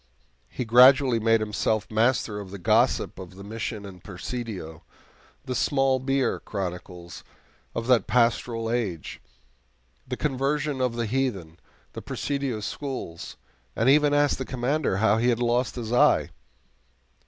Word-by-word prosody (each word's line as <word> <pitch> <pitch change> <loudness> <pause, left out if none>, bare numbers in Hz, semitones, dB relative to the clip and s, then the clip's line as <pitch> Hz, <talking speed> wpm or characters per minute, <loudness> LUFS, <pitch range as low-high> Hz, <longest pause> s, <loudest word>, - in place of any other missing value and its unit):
He 125 - -4
gradually 125 +1 +6
made 115 0 +3
himself 110 0 -1
master 110 -1 +1
of 100 -2 -8
the 100 - -7
gossip 90 - +1
of 95 -1 -10
the 100 - -10
Mission 110 0 -5
and 90 -3 -12
Presidio, 95 -4 -6 0.6
the 130 - -3
"small 135 +1 +1
beer" 135 0 0
chronicles 90 -2 -6 0.5
of 115 - -2
that 125 -2 +3
pastoral 115 -1 +1
age, 100 -10 -3 0.9
the 125 -1 -4
conversion 140 0 -1
of 125 -2 0
the 120 0 -1
heathen, 105 -9 -2 0.3
the - - -7
Presidio 140 -6 -3
schools, 125 - -6 0.4
and 115 +4 +2
even 150 0 +4
asked 145 -1 +2
the - - -1
Commander 130 -2 -1
how 110 +1 +3
he 120 +2 +2
had 120 - +2
lost 120 +1 0
his 120 -1 -4
eye! 125 - +4
120 Hz, 140 wpm, -25 LUFS, 105-130 Hz, 0.9 s, gradually